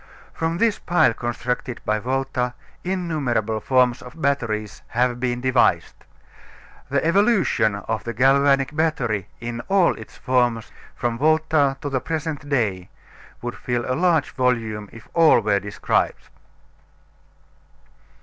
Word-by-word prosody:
From 165 Hz, +1 st, -2 dB
this 225 Hz, +1 st, +1 dB
pile 175 Hz, -9 st, +3 dB
constructed 120 Hz, +1 st, -3 dB
by 110 Hz, 0 st, +1 dB
Volta 130 Hz, 0 st, -2 dB, 0.3 s
innumerable 150 Hz, -, -1 dB
forms 125 Hz, 0 st, +2 dB
of 125 Hz, +6 st, -12 dB
batteries 115 Hz, -8 st, -1 dB
have 120 Hz, 0 st, 0 dB
been 120 Hz, -1 st, -1 dB
devised. 130 Hz, -1 st, +2 dB, 1.0 s
The 140 Hz, +1 st, 0 dB
evolution 170 Hz, -, +3 dB
of 110 Hz, +2 st, -4 dB
the 115 Hz, -, -4 dB
galvanic 135 Hz, +3 st, +3 dB
battery 125 Hz, -, 0 dB
in 120 Hz, 0 st, -5 dB
all 190 Hz, -3 st, +4 dB
its 110 Hz, -, -12 dB
forms, 120 Hz, -3 st, 0 dB, 0.2 s
from 120 Hz, -1 st, -2 dB
Volta 155 Hz, -2 st, +2 dB
to 145 Hz, -, -3 dB
the 130 Hz, -2 st, 0 dB
present 155 Hz, -3 st, -4 dB
day, 105 Hz, -10 st, 0 dB, 0.5 s
would 120 Hz, 0 st, -4 dB
fill 120 Hz, -1 st, -2 dB
a 130 Hz, -, -1 dB
large 160 Hz, -1 st, +2 dB
volume 115 Hz, -5 st, -1 dB
if 115 Hz, -, -13 dB
all 165 Hz, -2 st, +6 dB
were 105 Hz, -2 st, +1 dB
described. 100 Hz, +1 st, -1 dB
125 Hz, 125 wpm, -22 LUFS, 115-150 Hz, 1.0 s, all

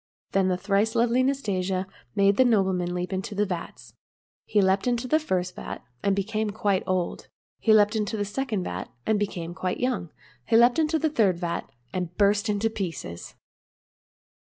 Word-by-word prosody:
Then 195 Hz, -1 st, +2 dB
the 180 Hz, -1 st, +1 dB
thrice 200 Hz, +3 st, +1 dB
lovely 240 Hz, +2 st, +3 dB
Nastasia 195 Hz, -9 st, 0 dB, 0.3 s
made 200 Hz, 0 st, +4 dB
the 260 Hz, -, +7 dB
nobleman 190 Hz, -6 st, +2 dB
leap 180 Hz, +2 st, -3 dB
into 190 Hz, +2 st, -3 dB
the 205 Hz, +1 st, +2 dB
vats. 180 Hz, -4 st, -6 dB, 0.5 s
He 210 Hz, -, +2 dB
leaped 195 Hz, +3 st, +2 dB
into 245 Hz, 0 st, 0 dB
the 310 Hz, +5 st, +3 dB
first 185 Hz, -, -2 dB
vat, -, -, -7 dB, 0.2 s
and 200 Hz, -1 st, +2 dB
became 215 Hz, +2 st, -1 dB
quite 200 Hz, -2 st, 0 dB
old; 185 Hz, -2 st, -1 dB, 0.3 s
he 225 Hz, -, +2 dB
leaped 210 Hz, 0 st, +5 dB
into 215 Hz, 0 st, -1 dB
the 205 Hz, -, -1 dB
second 215 Hz, -2 st, -2 dB
vat, 90 Hz, -, -5 dB, 0.2 s
and 215 Hz, -1 st, +2 dB
became 175 Hz, -4 st, -3 dB
quite 185 Hz, 0 st, -3 dB
young; 250 Hz, -9 st, -1 dB, 0.4 s
he 225 Hz, -, +5 dB
leaped 240 Hz, +5 st, +5 dB
into 320 Hz, 0 st, +2 dB
the 315 Hz, -1 st, 0 dB
third 205 Hz, -, +3 dB
vat, 170 Hz, -1 st, -3 dB, 0.2 s
and 180 Hz, -1 st, -4 dB
burst 205 Hz, +1 st, +3 dB
to 210 Hz, +1 st, +1 dB
pieces. 165 Hz, -, -5 dB
200 Hz, 175 wpm, -26 LUFS, 185-225 Hz, 0.5 s, the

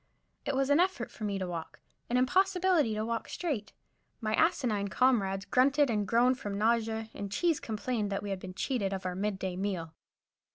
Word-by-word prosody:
It 280 Hz, -, 0 dB
was 270 Hz, +1 st, +1 dB
an 285 Hz, -, +5 dB
effort 370 Hz, +2 st, +1 dB
for 215 Hz, -, -6 dB
me 200 Hz, -1 st, -1 dB
to 190 Hz, -, -2 dB
walk, 170 Hz, -2 st, -6 dB, 0.3 s
an 245 Hz, -, +2 dB
impossibility 365 Hz, -, +3 dB
to 215 Hz, +1 st, -1 dB
walk 230 Hz, 0 st, -3 dB
straight. 280 Hz, -, -3 dB, 0.5 s
My 215 Hz, -2 st, -1 dB
asinine 245 Hz, -, +2 dB
comrades 195 Hz, -4 st, +2 dB
grunted 275 Hz, +1 st, +3 dB
and 210 Hz, -2 st, 0 dB
groaned 245 Hz, +3 st, +3 dB
from 205 Hz, -5 st, -4 dB
nausea, 225 Hz, 0 st, +1 dB
and 200 Hz, -1 st, -6 dB
Cheese 330 Hz, -, +1 dB
complained 215 Hz, -1 st, -2 dB
that 195 Hz, -, -2 dB
we 205 Hz, -, -4 dB
had 195 Hz, -, -2 dB
been 185 Hz, 0 st, -8 dB
cheated 205 Hz, -4 st, -1 dB
of 190 Hz, -1 st, -5 dB
our 180 Hz, -, -1 dB
mid 200 Hz, +2 st, -2 dB
day 190 Hz, -1 st, -3 dB
meal. 180 Hz, -4 st, -3 dB
220 Hz, 195 wpm, -31 LUFS, 200-265 Hz, 0.5 s, an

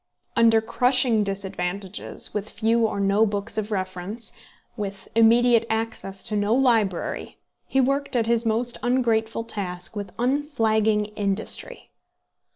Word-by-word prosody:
Under 225 Hz, -1 st, +5 dB
crushing 245 Hz, -1 st, +3 dB
disadvantages, 195 Hz, -1 st, -3 dB
with 210 Hz, 0 st, -3 dB
few 225 Hz, 0 st, +2 dB
or 200 Hz, -, -4 dB
no 200 Hz, +2 st, +3 dB
books 205 Hz, 0 st, -2 dB
of 215 Hz, -1 st, -1 dB
reference, 190 Hz, +3 st, -4 dB, 0.4 s
with 200 Hz, -3 st, -6 dB
immediate 230 Hz, +1 st, +5 dB
access 220 Hz, -3 st, -3 dB
to 215 Hz, -, -3 dB
no 205 Hz, +2 st, +2 dB
library, 225 Hz, -9 st, 0 dB, 0.3 s
he 265 Hz, -, +1 dB
worked 275 Hz, +1 st, +1 dB
at 235 Hz, -2 st, +2 dB
his 235 Hz, 0 st, +2 dB
most 235 Hz, +2 st, 0 dB
ungrateful 230 Hz, -3 st, +1 dB
task 190 Hz, -4 st, -3 dB
with 205 Hz, -1 st, -5 dB
unflagging 225 Hz, -5 st, +1 dB
industry. 210 Hz, -, -3 dB
220 Hz, 125 wpm, -24 LUFS, 200-235 Hz, 0.4 s, Under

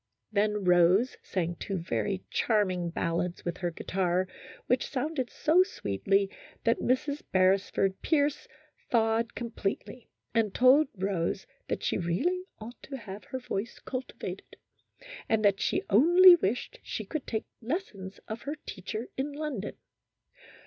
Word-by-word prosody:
Then 210 Hz, 0 st, +1 dB
Rose 180 Hz, +7 st, +4 dB
sang 175 Hz, -2 st, -2 dB
two 195 Hz, -, -3 dB
very 185 Hz, +3 st, -2 dB
charming 185 Hz, -6 st, +1 dB
ballads 170 Hz, +1 st, -2 dB
with 175 Hz, 0 st, -2 dB
her 175 Hz, -, 0 dB
guitar, 180 Hz, +1 st, 0 dB, 0.4 s
which 250 Hz, 0 st, +1 dB
sounded 275 Hz, -1 st, -2 dB
so 330 Hz, +4 st, +4 dB
sweetly 195 Hz, -, +1 dB, 0.4 s
that 230 Hz, -, +2 dB
Mrs. 285 Hz, +3 st, 0 dB
Beresford 190 Hz, 0 st, +2 dB
Pierce 290 Hz, -2 st, +1 dB, 0.4 s
thawed 225 Hz, 0 st, +2 dB
com 235 Hz, -1 st, -4 dB
pletely, 205 Hz, +3 st, -4 dB, 0.3 s
and 225 Hz, -4 st, +1 dB
told 265 Hz, +4 st, +6 dB
Rose 190 Hz, -1 st, -1 dB, 0.2 s
that -, -, -3 dB
she -, -, 0 dB
really 330 Hz, -, 0 dB
ought 225 Hz, +3 st, -10 dB
to 275 Hz, -, -7 dB
have 205 Hz, -4 st, -9 dB
her 260 Hz, -, -5 dB
voice 235 Hz, -3 st, -4 dB
cultivated, 255 Hz, 0 st, -6 dB, 0.7 s
and 220 Hz, -1 st, +2 dB
she -, -, 0 dB
only 350 Hz, -, +8 dB
wished 245 Hz, -, -1 dB
that -, -, -17 dB
she -, -, -5 dB
could 310 Hz, -4 st, -5 dB
take 220 Hz, -2 st, -2 dB, 0.2 s
lessons 225 Hz, -, -4 dB
of 220 Hz, +2 st, -5 dB
her 290 Hz, +2 st, -4 dB
teacher 215 Hz, +5 st, -5 dB
in 280 Hz, +2 st, -2 dB
London. 285 Hz, -9 st, -4 dB
215 Hz, 135 wpm, -29 LUFS, 190-260 Hz, 0.7 s, only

